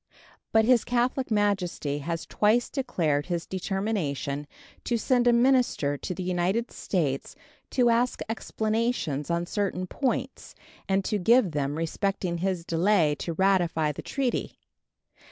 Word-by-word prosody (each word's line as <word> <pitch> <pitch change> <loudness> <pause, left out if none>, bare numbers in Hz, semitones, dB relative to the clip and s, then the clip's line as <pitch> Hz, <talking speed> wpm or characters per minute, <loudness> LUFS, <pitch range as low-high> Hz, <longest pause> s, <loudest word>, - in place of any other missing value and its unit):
But 220 0 +4
His 245 -1 +4
Catholic 245 +1 0
Majesty 190 -9 0
has 165 +3 -4
twice 220 +3 +2
declared 160 - 0
his 170 -2 -2
determination 175 - -2 0.4
to 240 - 0
send 245 +1 +2
a - - +7
minister 240 - +3
to 180 +5 -5
the 185 - -4
United 185 +6 0
States 145 -8 -2 0.3
to 245 -2 +3
ask 240 +2 +1
explanations 220 - -1
on 170 0 0
certain 185 -1 -2
points 260 +5 -3 0.3
and 195 0 +1
to 210 - 0
give 225 0 +4
them 145 -1 -1
respecting 175 +2 -2
his 185 -2 -1
delay 170 -2 +3
to 170 - -3
ratify 175 -4 +2
the 145 - -7
treaty. 265 -3 -2
190 Hz, 135 wpm, -27 LUFS, 165-230 Hz, 0.4 s, a